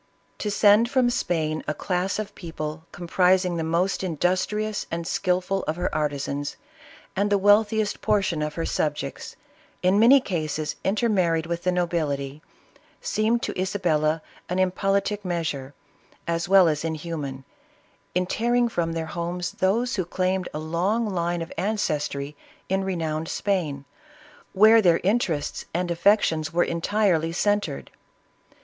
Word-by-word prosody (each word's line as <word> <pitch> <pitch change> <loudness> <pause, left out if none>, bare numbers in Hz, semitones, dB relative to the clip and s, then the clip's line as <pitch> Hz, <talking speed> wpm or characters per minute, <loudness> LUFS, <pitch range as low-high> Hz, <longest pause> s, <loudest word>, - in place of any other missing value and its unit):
To 210 - -2
send 210 +3 +5
from 250 -2 +2
Spain 155 -8 -1
a 150 - -1
class 180 +3 -1
'of 215 -1 -5
people 160 -2 -6
comprising 180 +1 +2
the 165 - -1
most 170 +5 0
in 175 -4 -2
dustrious 210 +5 0
and 165 0 -3
skilful 185 +2 0
of 155 - 0
her 175 +1 -2
artisans, 145 -2 -2 0.6
and 200 +2 +1
the 205 - +3
wealthiest 205 +1 +3
portion 190 -6 +1
of 150 0 -3
her 165 - -2
subjects, 145 -2 -3 0.5
in 185 +3 +4
many 250 +5 +7
cases 155 - -3
intermarried 190 -6 +1
with 170 0 -3
the 180 - +1
nobility, 155 -5 -1 0.6
seemed 225 +2 0
to - - -2
Isabella 165 -5 0 0.3
an 180 - -1
impolitic 195 +2 0
measure, 160 -7 -3 0.5
as 170 +1 -1
well 190 -2 +7
as 150 -1 0
inhuman 150 -4 -4 0.7
in 180 0 +2
tearing 240 +5 +1
from 170 -6 -1
their 165 -1 -2
homes 175 +2 -3
those 230 +6 0
who 185 - 0
claimed 185 +1 -1
a - - -5
long 180 +9 0
line 175 -3 -1
of 165 - -10
ancestry 150 -8 -2 0.3
in 190 +1 +1
renowned 165 -4 -2
Spain, 155 -9 -1 0.7
where 220 +3 +7
their 175 -4 +4
interests 185 -7 0
and 175 0 0
affections 170 -3 +2
were 175 +1 +3
entirely 170 -2 +1
cen 205 +4 +2
tred. 145 -8 -6
180 Hz, 140 wpm, -25 LUFS, 160-200 Hz, 0.7 s, many